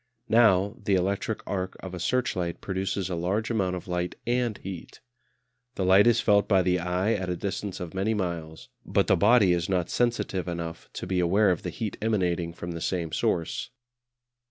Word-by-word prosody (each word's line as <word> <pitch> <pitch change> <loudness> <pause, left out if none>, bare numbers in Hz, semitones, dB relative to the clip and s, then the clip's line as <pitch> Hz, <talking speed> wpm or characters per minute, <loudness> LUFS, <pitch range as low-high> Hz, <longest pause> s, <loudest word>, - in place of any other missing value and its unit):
Now, 105 -3 +4
the 100 -1 +2
electric 100 +4 -1
arc 95 -1 -3
of 95 -1 -7
a 90 - -5
searchlight 90 -5 -1
produces 95 -1 -2
a 95 - -4
large 100 +7 -1
amount 95 -5 0
of 90 - -7
light 90 0 -2
and 120 -2 0
heat. 95 -3 -8 0.8
The 95 - -1
light 95 +4 +6
is 120 - +4
felt 100 -1 +3
by 95 -3 +4
the 90 0 +2
eye 90 +5 0
at 95 -4 -2
a 90 - 0
distance 100 +1 -4
of 90 -3 -6
many 100 +4 0
miles, 85 -5 -4 0.2
but - - +1
the - - +4
body 105 -4 +5
is 85 0 -1
not 90 -2 0
sensitive 115 -7 0
enough 85 -1 -5
to - - -5
be 90 0 0
aware 95 +3 +3
of 90 - -1
the 90 - -4
heat 105 +4 -4
emanating 90 -6 0
from 85 +1 -7
the 85 -1 -6
same 85 -4 -2
source. 85 +1 -1
95 Hz, 190 wpm, -27 LUFS, 90-100 Hz, 0.8 s, light